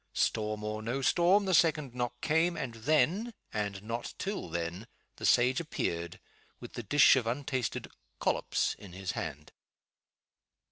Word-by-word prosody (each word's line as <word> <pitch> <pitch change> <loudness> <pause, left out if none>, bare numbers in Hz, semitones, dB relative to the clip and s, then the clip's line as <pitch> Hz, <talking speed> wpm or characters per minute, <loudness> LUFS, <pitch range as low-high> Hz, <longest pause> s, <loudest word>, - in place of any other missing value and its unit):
Storm 105 -1 0
or 105 0 -3
no 120 +5 -2
storm, 185 +7 +4
the 190 - +1
second 155 -6 +3
knock 120 -1 -3
came 165 +2 +2
and 135 -6 -3
then, 155 - +1 0.2
and 100 -2 -3
not 115 +2 -4
till 200 - -3
then, 85 +6 -4 0.3
the - - -1
sage 125 +2 +4
appeared, 85 - -3 0.4
with - - -10
the - - -4
dish 140 +8 +6
of 125 -4 0
untasted 130 -1 -2 0.3
"collops" - - +1
in 95 -4 -11
his 95 -1 -3
hand. 75 +1 -6
120 Hz, 145 wpm, -31 LUFS, 105-155 Hz, 0.4 s, dish